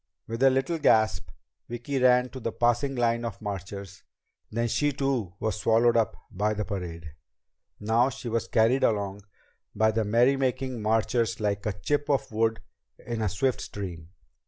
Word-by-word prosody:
With 115 Hz, +2 st, -5 dB
a 135 Hz, -, +7 dB
little 135 Hz, +6 st, 0 dB
gasp, 110 Hz, -, +3 dB, 0.4 s
Vicki 120 Hz, +4 st, -3 dB
ran 125 Hz, 0 st, +4 dB
to 130 Hz, -, -8 dB
the 115 Hz, -, -3 dB
passing 120 Hz, +4 st, +1 dB
line 115 Hz, -1 st, +1 dB
of 115 Hz, -5 st, -5 dB
marchers, 100 Hz, -2 st, -6 dB, 0.5 s
and 110 Hz, -, -8 dB
then 120 Hz, 0 st, +1 dB
she 145 Hz, +5 st, +1 dB
too 135 Hz, -9 st, -2 dB
was 110 Hz, -1 st, -2 dB
swallowed 115 Hz, +2 st, +3 dB
up 115 Hz, -2 st, +1 dB
by 105 Hz, +3 st, 0 dB
the 105 Hz, 0 st, -2 dB
parade. 85 Hz, -6 st, -6 dB, 0.7 s
Now 115 Hz, +4 st, +2 dB
she 125 Hz, -, -8 dB
was 115 Hz, 0 st, -1 dB
carried 115 Hz, +4 st, +3 dB
along 100 Hz, -2 st, 0 dB, 0.5 s
by 110 Hz, +1 st, +3 dB
the 110 Hz, 0 st, 0 dB
merrymaking 130 Hz, +2 st, +1 dB
marchers 115 Hz, +1 st, +1 dB
like 100 Hz, -1 st, -1 dB
a 105 Hz, -, 0 dB
chip 145 Hz, +8 st, -1 dB
of 140 Hz, -5 st, 0 dB
wood 115 Hz, +1 st, 0 dB, 0.4 s
in 115 Hz, -2 st, -5 dB
a 105 Hz, -, +1 dB
swift 120 Hz, +8 st, 0 dB
stream. 85 Hz, -5 st, -7 dB
115 Hz, 165 wpm, -27 LUFS, 105-125 Hz, 0.7 s, a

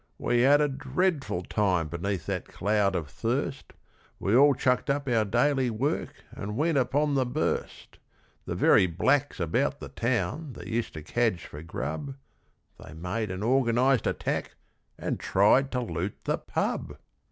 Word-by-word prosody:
we 120 Hz, 0 st, +1 dB
had 140 Hz, +3 st, +6 dB
a 150 Hz, -, +3 dB
dreadful 140 Hz, -, -1 dB
time 90 Hz, -5 st, +1 dB
beneath 85 Hz, +2 st, -3 dB
that -, -, -3 dB
cloud 100 Hz, -1 st, +1 dB
of 85 Hz, -4 st, -2 dB
thirst! 70 Hz, -, -3 dB, 0.5 s
We 100 Hz, +4 st, +1 dB
all 140 Hz, +2 st, +6 dB
chucked 125 Hz, 0 st, +1 dB
up 140 Hz, 0 st, 0 dB
our 115 Hz, -3 st, +3 dB
daily 125 Hz, +5 st, +2 dB
work 120 Hz, +6 st, -2 dB
and 105 Hz, +2 st, -6 dB
went 155 Hz, 0 st, +2 dB
upon 140 Hz, +4 st, +1 dB
the 135 Hz, -2 st, +3 dB
burst. 130 Hz, +5 st, -3 dB, 0.5 s
The -, -, -2 dB
very 95 Hz, -, +5 dB
blacks 135 Hz, -, +1 dB
about 85 Hz, -2 st, 0 dB
the -, -, -8 dB
town 120 Hz, -, -2 dB
that -, -, -10 dB
used 115 Hz, -4 st, -3 dB
to 75 Hz, -, -7 dB
cadge 110 Hz, 0 st, 0 dB
for 75 Hz, -, -9 dB
grub, 80 Hz, -, -5 dB, 0.7 s
They -, -, -11 dB
made 95 Hz, +6 st, -3 dB
an 95 Hz, +2 st, -4 dB
organised 125 Hz, +1 st, +3 dB
attack -, -, -2 dB, 0.4 s
and -, -, -3 dB
tried 110 Hz, +8 st, +3 dB
to 125 Hz, -, 0 dB
loot 100 Hz, -4 st, -3 dB
the -, -, -1 dB
pub. -, -, -3 dB
120 Hz, 155 wpm, -27 LUFS, 95-135 Hz, 0.7 s, had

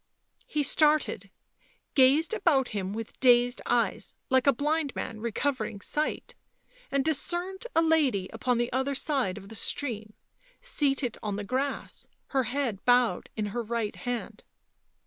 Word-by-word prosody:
He 300 Hz, -1 st, 0 dB
started, 295 Hz, -, +2 dB, 0.6 s
gazed 280 Hz, +7 st, +4 dB
about 315 Hz, -, +2 dB
him 195 Hz, -3 st, -3 dB
with 225 Hz, +1 st, -6 dB
dazed 245 Hz, -1 st, +4 dB
eyes, 240 Hz, -1 st, 0 dB, 0.2 s
like 260 Hz, +1 st, +3 dB
a -, -, +8 dB
blind 295 Hz, +2 st, -1 dB
man 220 Hz, -, -4 dB
recovering 235 Hz, 0 st, -2 dB
sight, 300 Hz, +9 st, -2 dB, 0.6 s
and 275 Hz, -1 st, +1 dB
discerned 350 Hz, -, -1 dB
a 330 Hz, -, +5 dB
lady 285 Hz, -, +2 dB
upon 240 Hz, +2 st, 0 dB
the 240 Hz, +1 st, -1 dB
other 265 Hz, +2 st, 0 dB
side 265 Hz, -10 st, 0 dB
of 200 Hz, -1 st, -10 dB
the -, -, -9 dB
stream, 220 Hz, -3 st, -2 dB, 0.5 s
seated 275 Hz, -, 0 dB
on 210 Hz, -2 st, -2 dB
the 205 Hz, -, -4 dB
grass, 260 Hz, +7 st, -2 dB, 0.2 s
her 265 Hz, -2 st, +1 dB
head 245 Hz, -6 st, -2 dB
bowed 245 Hz, -1 st, +3 dB
in 215 Hz, -1 st, -1 dB
her 240 Hz, -, -1 dB
right 230 Hz, -1 st, -2 dB
hand. 235 Hz, -2 st, -4 dB
255 Hz, 145 wpm, -28 LUFS, 225-285 Hz, 0.6 s, a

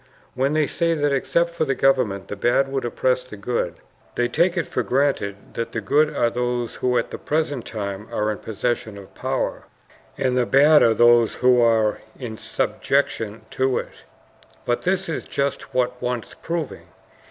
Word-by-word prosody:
When 135 Hz, +3 st, 0 dB
they 155 Hz, -1 st, +3 dB
say 165 Hz, +2 st, 0 dB
that 145 Hz, -2 st, +1 dB
except 170 Hz, +5 st, +1 dB
for 170 Hz, -1 st, -1 dB
the 135 Hz, -3 st, 0 dB
government 110 Hz, -9 st, +1 dB
the -, -, -5 dB
bad 130 Hz, +6 st, +2 dB
would 135 Hz, -2 st, -2 dB
oppress 125 Hz, +1 st, +1 dB
the 125 Hz, -4 st, -11 dB
good, 100 Hz, -5 st, -2 dB, 0.4 s
they 120 Hz, -, +1 dB
take 175 Hz, +7 st, +1 dB
it 170 Hz, -, +1 dB
for 125 Hz, -, -2 dB
granted 120 Hz, -4 st, -1 dB
that 115 Hz, -, -4 dB
the 115 Hz, -, -1 dB
good 150 Hz, +9 st, +3 dB
are 120 Hz, -1 st, +1 dB
those 120 Hz, -1 st, -2 dB
who 125 Hz, -1 st, +1 dB
at -, -, -1 dB
the -, -, -6 dB
present 145 Hz, -5 st, -1 dB
time 100 Hz, -1 st, -5 dB
are 105 Hz, 0 st, 0 dB
in 105 Hz, -, -5 dB
possession 110 Hz, -1 st, -3 dB
of 100 Hz, -1 st, -13 dB
power, -, -, -2 dB, 0.5 s
and 130 Hz, -1 st, +1 dB
the 125 Hz, -1 st, +2 dB
bad 145 Hz, +3 st, +6 dB
are 115 Hz, -1 st, +4 dB
those 120 Hz, -1 st, +5 dB
who 125 Hz, -1 st, +4 dB
are 110 Hz, -2 st, +2 dB, 0.2 s
in 120 Hz, -4 st, -6 dB
subjection 115 Hz, -6 st, -1 dB
to 130 Hz, -1 st, +1 dB
it. -, -, -6 dB, 0.6 s
But 120 Hz, -, 0 dB
this 190 Hz, +1 st, 0 dB
is 165 Hz, -, -3 dB
just 140 Hz, 0 st, -3 dB
what 125 Hz, 0 st, -1 dB
wants 125 Hz, -2 st, -3 dB
proving. 165 Hz, -4 st, -5 dB
125 Hz, 180 wpm, -23 LUFS, 115-140 Hz, 0.6 s, bad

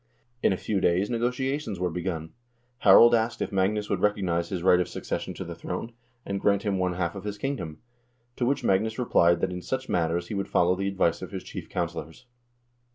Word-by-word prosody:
In -, -, +3 dB
a 95 Hz, -, 0 dB
few 100 Hz, 0 st, -1 dB
days 95 Hz, +6 st, +2 dB
negotiations 125 Hz, -, -1 dB
were 90 Hz, -1 st, 0 dB
begun. 85 Hz, -2 st, -4 dB, 0.5 s
Harald 120 Hz, 0 st, +8 dB
asked 115 Hz, 0 st, +1 dB
if -, -, -2 dB
Magnus 100 Hz, +2 st, +1 dB
would -, -, -1 dB
recognize 90 Hz, -5 st, +1 dB
his 90 Hz, -3 st, -3 dB
right 90 Hz, -1 st, +5 dB
of 90 Hz, -, 0 dB
succession -, -, -4 dB
to -, -, -5 dB
the -, -, -7 dB
throne, 115 Hz, -, -5 dB, 0.3 s
and 100 Hz, 0 st, -3 dB
grant 100 Hz, -1 st, +2 dB
him 100 Hz, -3 st, 0 dB
one 90 Hz, -1 st, 0 dB
half 85 Hz, -1 st, -2 dB
of 100 Hz, -, -8 dB
his 105 Hz, 0 st, -4 dB
kingdom; 100 Hz, -, -4 dB, 0.6 s
to -, -, -2 dB
which 140 Hz, +1 st, 0 dB
Magnus 110 Hz, +4 st, +1 dB
replied 85 Hz, -8 st, +3 dB
that 95 Hz, -, 0 dB
in 90 Hz, -, -5 dB
such 130 Hz, +6 st, -3 dB
matters 85 Hz, 0 st, 0 dB
he -, -, -4 dB
would 100 Hz, -1 st, -2 dB
follow 90 Hz, +1 st, +3 dB
the 95 Hz, +1 st, -2 dB
advice 95 Hz, -4 st, +1 dB
of -, -, -6 dB
his -, -, -6 dB
chief -, -, -8 dB
counselors. 85 Hz, +5 st, -4 dB
95 Hz, 210 wpm, -27 LUFS, 90-110 Hz, 0.6 s, Harald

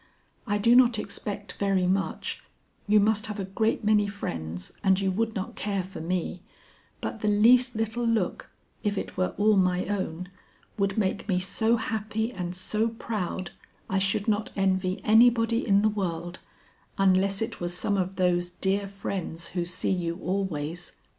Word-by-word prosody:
I 205 Hz, 0 st, +1 dB
do 230 Hz, +4 st, +4 dB
not 245 Hz, -2 st, +6 dB
expect 205 Hz, -1 st, -5 dB
very 195 Hz, -2 st, +2 dB
much 190 Hz, +2 st, -1 dB, 0.5 s
you 210 Hz, +1 st, +5 dB
must 210 Hz, +1 st, +2 dB
have 210 Hz, -1 st, -5 dB
a 195 Hz, -, -2 dB
great 220 Hz, +4 st, 0 dB
many 210 Hz, -1 st, +3 dB
friends, 85 Hz, -, -5 dB
and 190 Hz, -1 st, +4 dB
you 195 Hz, -1 st, +1 dB
would 225 Hz, +3 st, -1 dB
not 190 Hz, -2 st, -4 dB
care 200 Hz, -2 st, -2 dB
for 185 Hz, -3 st, -8 dB
me 180 Hz, +1 st, -2 dB, 0.6 s
but 225 Hz, -, -4 dB
the 215 Hz, -, -2 dB
least 240 Hz, +4 st, +5 dB
little 225 Hz, +2 st, -1 dB
look, 225 Hz, -6 st, 0 dB, 0.3 s
if 205 Hz, -1 st, -1 dB
it -, -, -4 dB
were 185 Hz, -, -1 dB
all 210 Hz, +1 st, +4 dB
my 185 Hz, -1 st, +2 dB
own, 180 Hz, -3 st, -3 dB, 0.5 s
would 195 Hz, 0 st, 0 dB
make 205 Hz, 0 st, -1 dB
me 180 Hz, -2 st, +2 dB
so 220 Hz, +5 st, +1 dB
happy 220 Hz, +1 st, -2 dB
and 180 Hz, -2 st, -4 dB
so 210 Hz, +4 st, +1 dB
proud 205 Hz, -5 st, -4 dB, 0.4 s
I 190 Hz, -, +2 dB
should 195 Hz, +2 st, 0 dB
not 215 Hz, 0 st, +1 dB
envy 190 Hz, -1 st, 0 dB
anybody 230 Hz, +1 st, +4 dB
in 200 Hz, 0 st, +4 dB
the -, -, +5 dB
world, 175 Hz, -4 st, -3 dB, 0.6 s
unless 195 Hz, 0 st, +3 dB
it 225 Hz, -2 st, -4 dB
was 175 Hz, 0 st, -2 dB
some 205 Hz, -, 0 dB
of 190 Hz, 0 st, -1 dB
those 175 Hz, -1 st, +1 dB
dear 195 Hz, +3 st, -1 dB
friends 190 Hz, -4 st, -5 dB
who 175 Hz, -1 st, -2 dB
see 175 Hz, +2 st, -1 dB
you 170 Hz, -2 st, -1 dB
always. 180 Hz, -3 st, -3 dB
195 Hz, 165 wpm, -27 LUFS, 185-215 Hz, 0.6 s, not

